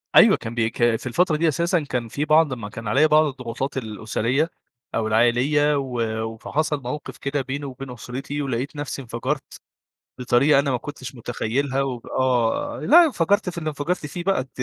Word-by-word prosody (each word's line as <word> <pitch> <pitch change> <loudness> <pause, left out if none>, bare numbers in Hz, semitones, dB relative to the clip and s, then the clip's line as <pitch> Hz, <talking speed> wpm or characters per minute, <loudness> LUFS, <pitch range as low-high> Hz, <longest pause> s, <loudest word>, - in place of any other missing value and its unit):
أيوه - - +8
كان 115 +1 -7
بي 115 -1 +1
ك - - -14 0.2
في 115 - -7
الفترة 160 +6 +2
دي 165 +1 +2
أساسًا 170 +3 +1
كان 125 -5 -3
في 145 +6 -2
بعض 155 -3 +4
ما 110 -4 -6
كان 110 +1 -8
عليّا 140 +8 +4
بعض 155 +1 +5
الضغوطات 130 0 -4
الأسرية 115 +6 -1 0.5
أو 110 -1 0
العائلية، 125 +7 +3
و 125 -4 -2 0.3
وفحصل 145 +6 -2
موقِف 145 +4 -5
كده 140 0 -2
بيني 140 +2 -4
وبين 130 0 -7
أسرتي، 135 +5 -5
ولقيت 135 +2 -3
نفسي 145 -1 -4
انفجرت 130 +4 -4 0.7
بطريقة 135 +4 +4
أنا 140 -1 +1
ما 125 - +1
كنتش 130 -1 -8
متخيلها، 125 +4 -1
و 130 -3 -2 0.2
آه 130 - +1
لأ 340 +3 +7
انفجرت 200 - +1
في 170 - -9
اللي 155 -2 -4
انفجرت 150 +3 -2
فيه 175 +4 -5
بقى 195 +1 +2
أنتِ 130 0 -6
135 Hz, 180 wpm, -23 LUFS, 120-150 Hz, 0.7 s, أيوه